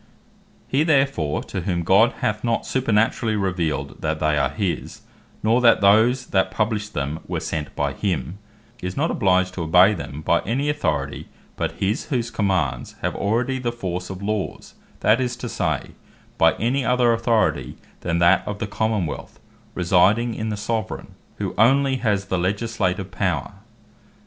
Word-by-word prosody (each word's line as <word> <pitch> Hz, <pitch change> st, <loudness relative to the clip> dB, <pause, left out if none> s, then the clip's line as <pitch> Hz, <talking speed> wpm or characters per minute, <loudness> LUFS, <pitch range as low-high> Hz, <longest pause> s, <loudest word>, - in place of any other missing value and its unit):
He 135 Hz, -, +1 dB
therefore, 135 Hz, -, +1 dB
to 95 Hz, -, -5 dB
whom 85 Hz, -1 st, -1 dB
God 100 Hz, +7 st, +4 dB
hath 105 Hz, 0 st, -1 dB
not 115 Hz, -1 st, 0 dB
supernaturally 115 Hz, -2 st, +1 dB
revealed, 85 Hz, -8 st, -2 dB
that 80 Hz, 0 st, -1 dB
they 75 Hz, 0 st, +2 dB
are 75 Hz, -, +2 dB
his, 100 Hz, -5 st, -3 dB, 0.4 s
nor 115 Hz, +3 st, +3 dB
that 115 Hz, -2 st, +6 dB
those 110 Hz, +6 st, +4 dB
that 95 Hz, -1 st, +2 dB
published 105 Hz, +1 st, -2 dB
them, 75 Hz, +2 st, -2 dB
were -, -, -2 dB
sent 75 Hz, -2 st, -4 dB
by 70 Hz, -1 st, -1 dB
him, 90 Hz, -1 st, -3 dB, 0.4 s
is 90 Hz, 0 st, -5 dB
not 160 Hz, +4 st, +1 dB
obliged 95 Hz, -1 st, +2 dB
to 95 Hz, -, -5 dB
obey 90 Hz, +5 st, +5 dB
them, 75 Hz, -7 st, -6 dB
by -, -, +3 dB
any 135 Hz, +7 st, -1 dB
Authority, 145 Hz, 0 st, -2 dB, 0.3 s
but -, -, -2 dB
his, 105 Hz, +7 st, -1 dB
whose 120 Hz, -5 st, -2 dB
Commands 90 Hz, -, -1 dB
have -, -, -1 dB
already 120 Hz, +6 st, 0 dB
the 120 Hz, -2 st, -1 dB
force 90 Hz, -6 st, -4 dB
of 95 Hz, 0 st, -7 dB
Laws; 105 Hz, -1 st, -3 dB, 0.3 s
that 110 Hz, +4 st, +4 dB
is 125 Hz, -1 st, -1 dB
to 120 Hz, +1 st, -6 dB
say, 80 Hz, -10 st, -2 dB, 0.5 s
by -, -, +5 dB
any 130 Hz, +5 st, 0 dB
other 125 Hz, -2 st, +3 dB
Authority, 110 Hz, -, 0 dB, 0.2 s
then 85 Hz, -1 st, -1 dB
that 85 Hz, +2 st, +5 dB
of 105 Hz, -, -3 dB
the 105 Hz, -, -3 dB
Common 105 Hz, -1 st, -1 dB
wealth, 75 Hz, -, -7 dB, 0.4 s
residing 95 Hz, +6 st, +3 dB
in 110 Hz, 0 st, -3 dB
the 105 Hz, -, -3 dB
Soveraign, 110 Hz, 0 st, -3 dB, 0.2 s
who -, -, -4 dB
only 135 Hz, +3 st, +4 dB
has 105 Hz, -5 st, 0 dB
the 95 Hz, -1 st, -1 dB
Legislative 95 Hz, -1 st, -1 dB
power. 95 Hz, 0 st, -1 dB
100 Hz, 165 wpm, -22 LUFS, 90-115 Hz, 0.5 s, that